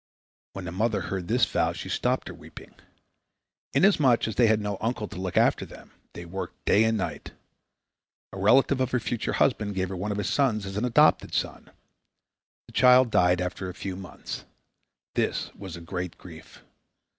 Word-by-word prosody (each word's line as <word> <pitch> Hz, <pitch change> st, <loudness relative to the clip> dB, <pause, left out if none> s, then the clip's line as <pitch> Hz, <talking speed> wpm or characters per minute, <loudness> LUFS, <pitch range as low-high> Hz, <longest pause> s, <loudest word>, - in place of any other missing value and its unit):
When 95 Hz, -2 st, -7 dB
the 85 Hz, -, -5 dB
mother 105 Hz, +4 st, 0 dB
heard 95 Hz, -3 st, -4 dB
this 115 Hz, 0 st, +3 dB
vow -, -, 0 dB
she -, -, -7 dB
stopped -, -, -1 dB
her -, -, -7 dB
weeping. -, -, -13 dB, 1.0 s
Inasmuch 150 Hz, -, +4 dB
as 110 Hz, -, -3 dB
they 115 Hz, +3 st, +4 dB
had 110 Hz, 0 st, +3 dB
no 105 Hz, -2 st, -3 dB
uncle 110 Hz, -1 st, -2 dB
to 90 Hz, -, -8 dB
look 95 Hz, -2 st, -3 dB
after -, -, +3 dB
them, -, -, -13 dB, 0.2 s
they 85 Hz, -, -8 dB
worked 95 Hz, +3 st, -7 dB
day 110 Hz, +2 st, +4 dB
and 110 Hz, 0 st, +1 dB
night. 95 Hz, -, -5 dB, 1.0 s
A 95 Hz, -, -6 dB
relative 130 Hz, +6 st, +4 dB
of 130 Hz, -, +1 dB
her 125 Hz, -, 0 dB
future 115 Hz, 0 st, -3 dB
husband 105 Hz, -6 st, +1 dB
gave 95 Hz, -1 st, -1 dB
her 95 Hz, -, -5 dB
one 100 Hz, +4 st, -3 dB
of 100 Hz, -, -2 dB
his 105 Hz, -2 st, -2 dB
sons 110 Hz, -3 st, +1 dB
as 95 Hz, 0 st, -6 dB
an 105 Hz, +4 st, 0 dB
adopted 120 Hz, -, +3 dB
son. -, -, -3 dB, 1.0 s
The -, -, -16 dB
child 125 Hz, -1 st, +6 dB
died 90 Hz, -1 st, +3 dB
after 90 Hz, +1 st, -4 dB
a 90 Hz, -, -8 dB
few 95 Hz, -1 st, -5 dB
months. 95 Hz, -2 st, -8 dB, 0.7 s
This -, -, -1 dB
was 95 Hz, -3 st, -9 dB
a 85 Hz, -, -9 dB
great 90 Hz, +1 st, -5 dB
grief. 80 Hz, -3 st, -13 dB
100 Hz, 185 wpm, -26 LUFS, 95-115 Hz, 1.0 s, child